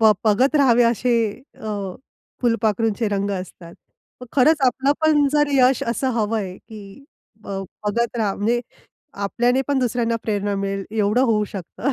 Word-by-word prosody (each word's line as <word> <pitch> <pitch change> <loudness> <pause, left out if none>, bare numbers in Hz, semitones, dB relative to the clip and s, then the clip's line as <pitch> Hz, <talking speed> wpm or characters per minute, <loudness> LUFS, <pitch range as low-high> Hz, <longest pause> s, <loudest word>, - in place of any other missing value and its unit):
ब 220 -1 +7
बघत 225 +7 +3
राहावे, 245 -4 +5
असे 240 +1 +1 0.4
अ, 200 -4 -5 0.5
फुलपाखरूंचे 225 -1 +1
रंग 200 0 -1
असतात. 185 -3 -7 0.5
मग 250 - -9
खरंच 295 +3 +4
आपलं 265 +3 +2
पण 305 -2 +4
जर 295 -1 +3
यश 260 -1 +4
असं 240 +3 -1
हवंय, 210 -4 -2
की 215 +3 -13 0.4
अ, - - -12 0.4
बघत 235 +3 -1
राहा 210 -4 0
म्हणजे 230 +4 0 0.6
आपल्याने 245 +5 +1
पण 280 -2 +2
दुसऱ्यांना 235 -2 0
प्रेरणा 205 -1 -1
मिळेल 195 0 -3
एवढं 215 +3 +1
होऊ 210 -1 +2
शकतं. 205 - -3
225 Hz, 145 wpm, -21 LUFS, 205-250 Hz, 0.6 s, ब